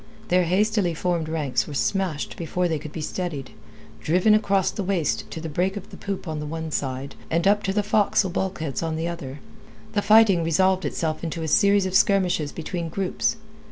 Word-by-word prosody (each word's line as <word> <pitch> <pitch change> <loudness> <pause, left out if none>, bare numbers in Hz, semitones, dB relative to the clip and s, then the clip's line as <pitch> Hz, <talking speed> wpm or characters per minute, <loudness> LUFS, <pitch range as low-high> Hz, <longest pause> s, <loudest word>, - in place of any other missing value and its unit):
Their 180 0 +3
hastily 195 0 +1
formed 170 -2 -1
ranks 150 -5 -1
were 145 - -7
smashed 185 -1 -1
before 175 +2 -1
they 160 -3 -1
could 150 +1 -8
be 160 - -6
steadied; 155 -5 -4 0.5
driven 180 - +3
across 200 -3 +2
the 210 - -4
waist 180 -5 -1
to - - -6
the 160 - -5
break 180 +6 -1
of 200 - -9
the - - -9
poop 195 -2 -5
on 155 -1 -3
the 150 - -5
one 160 +1 -5
side, 135 -1 -3 0.2
and 170 +3 +1
up 205 +1 +4
to 195 - -1
the 205 +1 +1
forecastle 205 -2 +2
bulkheads 175 -6 -2
on 165 -1 -2
the 165 +1 -2
other, 145 -5 -6 0.5
the 205 - +2
fighting 205 -4 +5
resolved 185 +3 +2
itself 155 -1 -2
into 165 0 -3
a - - -2
series 200 +4 +4
of 185 - -3
skirmishes 180 -6 +3
between 170 +1 -4
groups. 190 +6 -1
175 Hz, 195 wpm, -24 LUFS, 160-195 Hz, 0.5 s, fighting